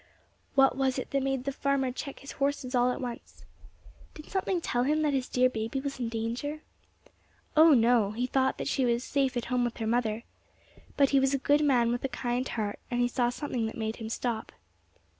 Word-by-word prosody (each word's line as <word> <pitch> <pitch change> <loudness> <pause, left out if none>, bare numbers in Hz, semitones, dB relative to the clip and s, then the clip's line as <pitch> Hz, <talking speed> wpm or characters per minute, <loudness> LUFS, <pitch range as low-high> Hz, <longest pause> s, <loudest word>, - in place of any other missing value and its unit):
What 270 -1 +5
was 265 -1 0
it 260 - -5
that 275 - +1
made 270 -1 -1
the 275 - -2
farmer 275 -1 0
check 275 +2 -7
his 275 - -8
horses 275 -2 -2
all 245 0 +3
at - - -4
once? 245 -3 -7 0.7
Did 305 - -11
something 380 -1 0
tell 245 -7 -1
him 305 +4 +1
that 295 -2 +1
his 260 -2 -1
dear 255 0 +4
baby 225 +2 -3
was 275 -1 -5
in 240 -2 -2
danger? 235 +7 -3 0.9
Oh, 315 -1 +8
no! 230 -3 +4
he 230 +4 -2
thought 265 +1 +1
that - - -4
she 265 - +1
was 240 0 +1
safe 270 -3 0
at 240 - -2
home 250 0 0
with 240 -1 -2
her 225 - -3
mother. 225 -1 0 0.7
But 280 -1 +4
he 275 - +5
was 270 +1 +2
a - - +1
good 290 +3 +2
man 245 -5 +3
with 245 - -2
a 270 - -1
kind 245 +1 -2
heart, 210 -3 -3
and 245 - -1
he 245 - +3
saw 245 0 +1
something 245 -3 -2
that 220 - -7
made 220 0 -3
him 220 -2 -6
stop. 230 -1 -3
255 Hz, 215 wpm, -29 LUFS, 235-275 Hz, 0.9 s, Oh